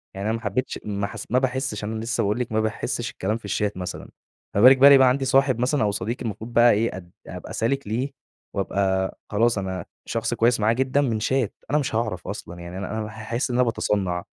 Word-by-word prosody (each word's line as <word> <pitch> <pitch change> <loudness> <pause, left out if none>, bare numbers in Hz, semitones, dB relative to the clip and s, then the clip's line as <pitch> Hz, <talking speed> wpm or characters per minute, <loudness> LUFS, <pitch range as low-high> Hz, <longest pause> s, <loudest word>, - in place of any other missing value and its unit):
يعني 100 +2 -2
أنا 110 - +1
ما 115 - -11
حبيتش 120 +5 -2
ما 100 -1 -2
حس - - -7
ما 125 - +4
باحسش 130 -4 -2
أنا 110 +1 -3
لسّه 115 +1 -1
باقول 105 +4 0
لِك، 125 - -3
ما 110 - +1
باحسش 110 -1 -2
الكلام 105 +4 -2
في 115 - -15
الشات 100 0 -1
مثلًا. 90 -1 -6 0.5
ما 100 - +3
بالِك 130 +3 +9
بقى 140 +2 +8
إن - - +9
يبقى 130 -1 +6
عندي 135 +1 0
صاحب 135 -2 +3
مثلًا 130 +2 +1
أو 105 - +2
صديق 115 +4 -3
المفروض 115 +1 -5
بقى 120 0 +6
إيه 110 -1 0
أد 90 -2 -12 0.2
أبقى - - -8
سالك 135 +2 -1
ليه 125 +6 -2 0.4
وأبقى 95 -1 0
خلاص 115 +2 +2
أنا 95 -2 -3 0.2
شخص 115 +1 -2
كويّس 115 0 +2
معاه 110 +2 +3
جدًا 130 +3 +1
من 115 -6 0
شات 130 0 0 0.2
أنا 150 - +2
مش 130 -6 -2
هاعرف 105 -6 -2
أصلًا، 85 +1 -7
يعني 85 +2 -8
أنا 100 +3 -4
أنا 110 0 -4
حاحس 110 +4 -3
إن - - -1
أنا 125 - +4
باتصنع. 100 -6 -1
110 Hz, 230 wpm, -24 LUFS, 100-125 Hz, 0.5 s, بالِك